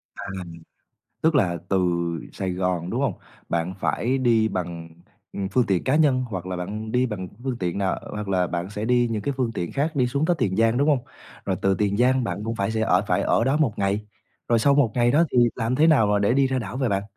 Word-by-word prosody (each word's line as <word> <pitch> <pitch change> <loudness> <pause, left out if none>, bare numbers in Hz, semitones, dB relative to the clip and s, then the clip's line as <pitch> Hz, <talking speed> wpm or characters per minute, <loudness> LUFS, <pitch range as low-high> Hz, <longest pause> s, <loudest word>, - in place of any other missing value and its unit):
À. - - -7 1.0
Tức 160 0 +2
là 90 -10 +2
từ 95 - +2 0.6
Sài 95 -2 -3
Gòn, 90 -1 -1
đúng - - -1
hông? - - +1 0.4
Bạn 85 +2 -1
phải 125 +8 0
đi 115 -4 +3
bằng, 85 -4 -5 0.4
ừm, 100 - -3
phương 125 +2 +2
tiện 95 -5 0
cá 130 +3 +1
nhân 140 -5 +3
hoặc 95 -4 -5
là 95 0 -4
bạn 105 +5 -5
đi 125 +1 +2
bằng 105 -6 -5 0.2
phương 130 -3 -2
tiện 90 -3 -2
nào? 95 -1 0
Hoặc 105 -1 -5
là 90 -2 +1
bạn 85 +2 -3
sẽ 105 +1 -4
đi 120 0 +3
những 110 -2 -2
cái 140 +7 -2
phương 125 -3 0
tiện 85 - -3
khác 150 +3 -1
đi 125 -3 +2
xuống 140 +5 0
tới 175 +1 +2
Tiền 100 -7 0
Giang, 115 +2 +3
đúng 145 +3 +2
hông? 145 -3 +3 0.5
Rồi - - 0
từ 95 - +3
Tiền 100 +1 0
Giang, 130 +2 +3
bạn 105 - -3
cũng 115 0 -2
phải 100 0 -1
sẽ 110 0 -1
ở 110 - +3
phải - - +1
ở - - +2
đó 135 +4 +2
1 145 -9 +1
ngày. 100 +2 -1 0.4
Rồi 115 -1 +3
sau 140 +5 +4
1 135 -6 +3
ngày 120 -1 +3
đó 150 +5 +4
thì - - 0 0.2
làm 115 +1 -1
thế 155 +4 +4
nào 140 -10 +5
mà 105 0 +2
để 100 +3 +2
đi 135 0 +3
ra 130 0 -1
đảo 115 +2 -5
vậy 130 -3 0
bạn? 100 -1 0
110 Hz, 250 wpm, -24 LUFS, 95-130 Hz, 1.0 s, nào